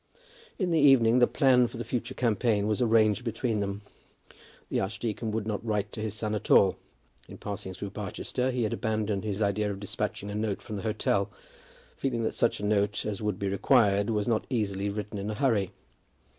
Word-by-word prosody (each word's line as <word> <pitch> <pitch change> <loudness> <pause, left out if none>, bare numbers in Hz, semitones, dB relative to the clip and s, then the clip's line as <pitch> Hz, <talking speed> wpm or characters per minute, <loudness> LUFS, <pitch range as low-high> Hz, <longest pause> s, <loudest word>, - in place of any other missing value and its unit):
In 185 -3 0
the 165 - +3
evening 125 -4 +6
the 120 - +6
plan 130 -2 +4
of 120 -1 +1
the 120 - -4
future 120 -1 -3
campaign 110 -3 +1
was 105 +2 0
arranged 110 -1 +3
between 115 -1 -1
them. 100 0 -3 0.8
The - - -1
archdeacon 110 +3 -3
would 110 -1 -2
not 105 -1 -3
write 105 -2 -1
to 110 - -6
his 110 -1 -3
son 110 -1 -2
at 105 - -4
all. 95 -2 +6 0.5
In - - -10
passing 95 -2 -6
through 100 +1 -6
Barchester 105 +5 -3
he 125 -2 -1
had 110 - -1
abandoned 110 -2 -1
his 105 0 -1
idea 105 +1 0
of 100 -1 -4
despatching 100 0 -3
a - - -5
note 105 -2 -1
from 110 - -6
the - - -4
hotel, 105 -2 0 0.7
feeling 120 -4 -1
that 110 - -1
such - - +1
a 105 - -3
note 105 0 +1
as 105 -1 -3
would 105 -3 -1
be 100 - -2
required 100 0 +3
was 105 -2 0
not 115 -2 0
easily 100 -5 -1
written 105 0 -4
in 100 +2 -4
a 110 - -3
hurry. 105 -6 +1
105 Hz, 200 wpm, -28 LUFS, 100-115 Hz, 0.8 s, evening